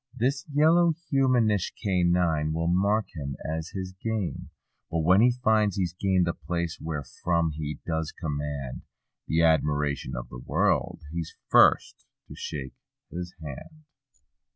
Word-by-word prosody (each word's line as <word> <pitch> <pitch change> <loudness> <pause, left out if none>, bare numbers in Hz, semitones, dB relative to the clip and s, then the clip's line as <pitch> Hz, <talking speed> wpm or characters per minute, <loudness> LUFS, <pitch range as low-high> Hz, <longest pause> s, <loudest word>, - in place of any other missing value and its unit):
This 135 +4 0
yellow 165 +3 +4 0.2
humanish 120 - +2
canine 85 -5 +1
will 85 +1 -1
mark 100 +5 +2
him 70 -3 -4
as 80 +1 -3
his 95 -1 -5
game; 110 -5 -3 0.4
But 80 0 0
when 95 +5 +5
he 125 - +6
finds 110 -4 +3
he's 90 -4 -1
gained 95 -1 +2
the 85 - 0
place 85 -1 -3
wherefrom 80 +2 -1
he 75 -1 -5
does 80 -1 -2
command 70 -5 -4 0.5
The 80 +1 +2
admiration 75 -2 +1
of - - -5
the 60 - -8
world—he's 80 +1 -1
first - - +4 0.2
to - - -10
shake 65 -4 -6 0.4
his 90 0 -6
hand. 155 - -9
85 Hz, 130 wpm, -27 LUFS, 75-100 Hz, 0.5 s, he